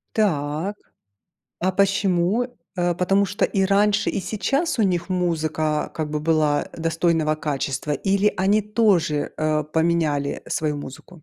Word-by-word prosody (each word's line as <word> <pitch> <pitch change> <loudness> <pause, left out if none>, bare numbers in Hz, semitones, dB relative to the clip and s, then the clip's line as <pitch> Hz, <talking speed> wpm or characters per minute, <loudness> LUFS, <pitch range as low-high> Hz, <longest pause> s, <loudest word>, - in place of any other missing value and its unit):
Так. 165 -2 0 0.9
А 185 +2 +2
почему? 195 +2 +2 0.3
Э, 175 -1 +1
потому 195 +3 +2
что 200 - -1
и 195 -1 +1
раньше, 205 +1 +2
и - - -2
сейчас 250 - -1
у - - +3
них 175 -3 0
музыка 155 -4 -1
как 155 -2 -3
бы 150 - -1
была, 155 -2 +2
э, - - -10
достойного 165 -1 +1
качества, 145 -1 -3
или 200 +5 +1
они 200 +3 +2
тоже, 200 -9 +1
э, 155 -1 0
поменяли, 155 -2 0
э, - - -14
свою 150 -2 -1
музыку? 145 +4 -10
170 Hz, 145 wpm, -23 LUFS, 155-195 Hz, 0.9 s, у